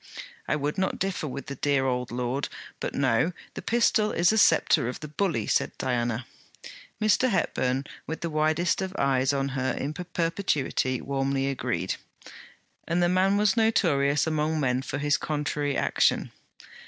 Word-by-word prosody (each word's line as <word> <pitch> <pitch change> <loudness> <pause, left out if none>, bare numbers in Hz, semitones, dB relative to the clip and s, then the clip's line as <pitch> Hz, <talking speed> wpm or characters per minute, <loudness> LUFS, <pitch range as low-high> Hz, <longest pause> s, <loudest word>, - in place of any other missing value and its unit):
'I - - +1
would 150 +3 -2
not 190 - 0
differ 190 -5 -2
with 140 -1 -6
the 140 - -5
dear 140 0 +1
old 125 -1 -1
lord; 125 +3 -2 0.3
but - - -4
no! 135 +5 +2 0.2
the - - -6
pistol 225 -2 +2
is 175 +3 +3
the 220 - +1
sceptre 120 - +4
of 125 - -6
the 150 - -7
bully,' 150 - -1
said - - 0
Diana. 120 -1 -1 0.7
Mr. 215 +4 +3
Hepburn, 130 - 0 0.2
with 160 - -5
the 170 - -2
widest 155 +4 +1
of 190 0 -4
eyes 135 -1 +2
on 140 -1 -1
her 130 -1 -1
in 145 +3 -3
perpetuity, 165 -6 -1
warmly 135 0 -1
agreed; 135 - -2 0.9
and 175 +1 +1
the 175 - +3
man 190 +2 +3
was 210 -1 +3
notorious 150 -11 +2
among 155 0 0
men 130 -3 +1
for 135 - -4
his 145 0 +2
contrary 145 -1 -2
action. - - +1
145 Hz, 160 wpm, -27 LUFS, 135-175 Hz, 0.9 s, sceptre